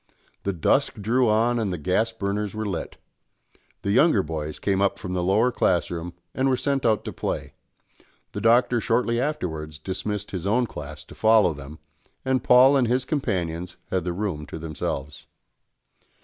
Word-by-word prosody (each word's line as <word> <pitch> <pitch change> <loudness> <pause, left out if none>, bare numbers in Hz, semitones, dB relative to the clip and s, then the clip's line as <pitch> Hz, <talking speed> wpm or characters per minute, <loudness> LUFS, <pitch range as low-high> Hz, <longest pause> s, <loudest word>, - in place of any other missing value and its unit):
The 100 - -1
dusk 85 -5 +1
drew 120 +4 +2
on 115 +3 +2
and 105 -4 -1
the 90 - -2
gas 95 +9 +1
burners 105 -1 -3
were 110 0 -3
lit. 95 -5 -4 0.9
The 100 - 0
younger 125 - +4
boys 75 -1 -4
came 95 -1 0
up 100 0 +2
from 90 -2 -5
the 90 - 0
lower 105 +7 +3
class 90 -8 +1
room 85 0 -5 0.2
and 135 +1 +1
were 130 - +2
sent 135 -2 0
out 110 -2 +1
to - - -5
play; - - -4 0.8
the - - -5
Doctor 120 +1 +4
shortly 120 +1 +1
afterwards 80 - -3
dismissed 100 +5 -4
his 95 -1 -4
own 120 +4 +2
class 75 -6 -8
to - - -13
follow 110 -5 +4
them, 70 +1 -10 0.5
and 130 -1 +1
Paul 130 +3 +7
and 130 -3 +3
his 125 +2 +1
companions 90 - -2
had 95 -2 0
the 90 - -2
room 85 -5 -3
to - - -7
themselves. 75 -2 -5
100 Hz, 175 wpm, -25 LUFS, 85-120 Hz, 0.9 s, Paul